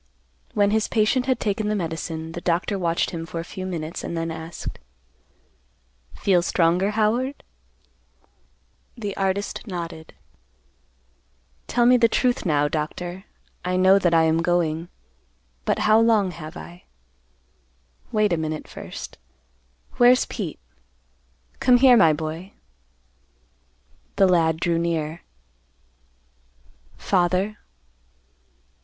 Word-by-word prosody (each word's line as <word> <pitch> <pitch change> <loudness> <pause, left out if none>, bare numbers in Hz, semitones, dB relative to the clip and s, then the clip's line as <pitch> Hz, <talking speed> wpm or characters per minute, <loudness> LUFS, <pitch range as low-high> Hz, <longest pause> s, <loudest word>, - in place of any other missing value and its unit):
When 205 -1 +3
his 220 0 +1
patient 235 +4 +1
had 260 -3 +1
taken 210 0 -1
the 215 - 0
medicine, 160 -2 -4
the 175 - -6
doctor 180 +4 0
watched 170 -2 0
him 165 -2 -5
for 165 - -5
a - - -3
few 185 +2 -7
minutes, 165 -2 -5
and 170 - -4
then 165 0 -2
asked, 160 +1 -7 1.4
"Feel 185 -3 +2
stronger, 175 +3 +2
Howard?" 240 +6 0 1.5
The 205 -4 -4
artist 195 +4 -2
nodded. 170 -4 -7 1.5
"Tell 240 - +2
me 250 +1 +6
the 235 -1 +5
truth, 245 -4 +1
now, 145 -2 +2
Doctor. 175 +5 -4 0.4
I 180 0 -1
know 190 +1 +5
that 175 -3 +2
I 165 -1 +4
am 160 +1 +2
going. 170 -1 0 0.8
But - - +1
how 215 +1 +6
long 220 -5 +3
have 155 -1 -9
I? 175 +1 -11 1.3
Wait 215 -4 +2
a - - +1
minute 155 -1 -4
first. - - -9 0.8
Where's 250 +1 +5
Pete? - - -5 1.0
Come 250 -1 +5
here, 255 0 +7
my 165 -8 +6
boy." 160 +5 -5 1.6
The 195 - +5
lad 165 -3 +2
drew 170 -1 +1
near. 165 -1 -2 1.8
"Father." 185 +3 0
180 Hz, 115 wpm, -23 LUFS, 165-210 Hz, 1.8 s, here